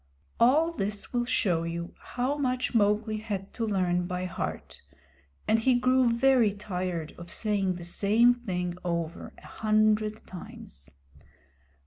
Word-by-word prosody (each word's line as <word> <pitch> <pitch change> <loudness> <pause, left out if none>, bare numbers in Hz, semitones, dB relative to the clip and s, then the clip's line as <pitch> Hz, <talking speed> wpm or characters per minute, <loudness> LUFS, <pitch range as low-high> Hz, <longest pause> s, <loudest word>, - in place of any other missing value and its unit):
All 300 +8 +4
this 205 -8 -4
will 240 -1 +1
show 180 -8 +1
you 170 +1 -4
how 255 +3 -2
much 255 -3 -1
Mowgli 215 0 +2
had 205 -3 -5
to 225 -2 -2
learn 180 -3 +1
by 180 0 -3
heart, 180 - -5 0.7
and 220 - +4
he 250 +3 +3
grew 255 0 +3
very 235 -2 +4
tired 180 -5 -4
of 170 0 -9
saying 200 -4 0
the 175 -1 -8
same 215 +7 +4
thing 180 -7 -3
over 170 -1 -3
a - - -16
hundred 215 0 +1
times. 70 - -11
210 Hz, 135 wpm, -28 LUFS, 180-240 Hz, 0.7 s, All